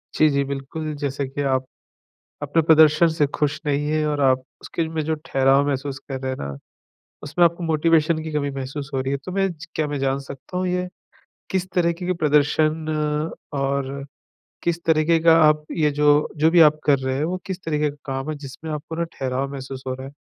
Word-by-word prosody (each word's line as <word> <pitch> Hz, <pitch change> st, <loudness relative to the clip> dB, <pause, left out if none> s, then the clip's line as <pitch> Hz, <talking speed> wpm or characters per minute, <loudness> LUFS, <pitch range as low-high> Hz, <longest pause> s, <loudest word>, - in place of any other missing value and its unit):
जी, 155 Hz, -, +5 dB
जी। 140 Hz, -1 st, +1 dB
बिल्कुल, 140 Hz, +3 st, -5 dB
जैसे 140 Hz, -1 st, -2 dB
कि 135 Hz, +2 st, -4 dB
आप, 130 Hz, -2 st, +1 dB, 0.8 s
अपने 145 Hz, +3 st, +1 dB
प्रदर्शन 155 Hz, +1 st, +6 dB
से 160 Hz, -2 st, +1 dB
खुश 150 Hz, 0 st, 0 dB
नहीं 145 Hz, 0 st, 0 dB
है 155 Hz, 0 st, +1 dB
और 145 Hz, -1 st, -1 dB
आप 130 Hz, -1 st, +3 dB, 0.2 s
उसके 165 Hz, -1 st, -3 dB
में 160 Hz, -1 st, -2 dB
जो 160 Hz, 0 st, 0 dB
ठहराव 135 Hz, -1 st, +3 dB
महसूस 135 Hz, -1 st, -2 dB
कर 135 Hz, -1 st, -4 dB
रहे 130 Hz, 0 st, -2 dB
हैं 130 Hz, -, -4 dB
ना, 70 Hz, 0 st, -5 dB, 0.7 s
उसमें 155 Hz, +4 st, +2 dB
आपको 170 Hz, +1 st, +1 dB
मोटिवेशन 160 Hz, 0 st, +2 dB
की 160 Hz, 0 st, -6 dB
कमी 145 Hz, -1 st, -1 dB
महसूस 135 Hz, +1 st, -6 dB
हो 135 Hz, -, +1 dB
रही 135 Hz, +1 st, -2 dB
है। 140 Hz, -, 0 dB
तो 185 Hz, -, -6 dB
मैं 195 Hz, 0 st, +1 dB, 0.3 s
क्या 155 Hz, -, 0 dB
मैं 145 Hz, -1 st, -3 dB
जान 135 Hz, 0 st, 0 dB
सकता 140 Hz, +6 st, -8 dB
हूँ 185 Hz, 0 st, 0 dB
ये, 180 Hz, 0 st, -1 dB, 0.6 s
किस 185 Hz, -1 st, -1 dB
तरीके 170 Hz, 0 st, 0 dB
के 185 Hz, -, +1 dB
प्रदर्शन 155 Hz, 0 st, +2 dB, 0.7 s
और 140 Hz, 0 st, -2 dB, 0.6 s
किस 170 Hz, 0 st, -1 dB
तरीके 160 Hz, +1 st, +3 dB
का 165 Hz, 0 st, +7 dB
आप 150 Hz, 0 st, +3 dB
ये 150 Hz, -2 st, +3 dB
जो 150 Hz, 0 st, +4 dB
जो 155 Hz, +2 st, +4 dB
भी 175 Hz, 0 st, +5 dB
आप 155 Hz, -1 st, +6 dB
कर 145 Hz, -2 st, +4 dB
रहे 130 Hz, 0 st, -2 dB
हैं 145 Hz, -, 0 dB
वो 175 Hz, +3 st, -1 dB
किस 190 Hz, -1 st, -5 dB
तरीके 150 Hz, -2 st, 0 dB
का 145 Hz, -, -14 dB
काम 135 Hz, +2 st, -3 dB
है 155 Hz, -, -4 dB
जिसमें 145 Hz, +3 st, -8 dB
आपको 150 Hz, +2 st, -5 dB
न -, -, +1 dB
ठहराव 135 Hz, +1 st, -3 dB
महसूस 135 Hz, -1 st, -7 dB
हो 130 Hz, -, -2 dB
रहा 130 Hz, +1 st, -8 dB
है? 135 Hz, -, -10 dB
150 Hz, 210 wpm, -22 LUFS, 135-160 Hz, 0.8 s, का